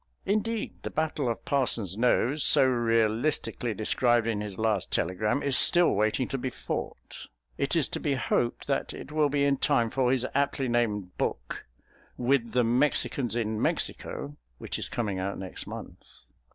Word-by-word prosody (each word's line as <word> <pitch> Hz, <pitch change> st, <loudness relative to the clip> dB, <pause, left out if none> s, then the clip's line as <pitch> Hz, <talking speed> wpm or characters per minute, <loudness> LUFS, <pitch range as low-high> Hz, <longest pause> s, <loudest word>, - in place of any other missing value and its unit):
Indeed 215 Hz, +2 st, -2 dB
the -, -, -5 dB
battle 155 Hz, -5 st, -1 dB
of 115 Hz, -, -4 dB
Parson's 120 Hz, -9 st, 0 dB
Nose, 125 Hz, +5 st, +1 dB
so 140 Hz, -3 st, +6 dB
realistically 115 Hz, 0 st, 0 dB
described 120 Hz, +2 st, +2 dB
in 110 Hz, -3 st, -1 dB
his 105 Hz, -3 st, -5 dB
last 110 Hz, -4 st, 0 dB
telegram, 105 Hz, +10 st, 0 dB
is 140 Hz, -2 st, +3 dB
still 175 Hz, +5 st, +6 dB
waiting 110 Hz, +5 st, 0 dB
to 135 Hz, -, -3 dB
be 130 Hz, -, -2 dB
fought. -, -, -6 dB, 0.3 s
It 140 Hz, +4 st, -1 dB
is 155 Hz, -7 st, +2 dB
to -, -, -3 dB
be 145 Hz, -3 st, 0 dB
hoped 120 Hz, -2 st, -1 dB
that -, -, -2 dB
it -, -, -9 dB
will 150 Hz, -1 st, +2 dB
be 140 Hz, 0 st, +1 dB
in 140 Hz, -1 st, +2 dB
time 120 Hz, -5 st, +1 dB
for 130 Hz, -2 st, +1 dB
his 130 Hz, -1 st, +2 dB
aptly 140 Hz, -1 st, 0 dB
named 105 Hz, -6 st, -1 dB
book, -, -, -3 dB, 0.5 s
With 120 Hz, -2 st, +1 dB
the 125 Hz, 0 st, +3 dB
Mexicans 125 Hz, 0 st, +1 dB
in 110 Hz, -2 st, -2 dB
Mexico, 70 Hz, +1 st, -2 dB, 0.2 s
which -, -, -5 dB
is -, -, -5 dB
coming 110 Hz, -7 st, -2 dB
out 95 Hz, +1 st, -3 dB
next 95 Hz, -1 st, -7 dB
month. -, -, -9 dB
120 Hz, 165 wpm, -27 LUFS, 110-140 Hz, 0.5 s, so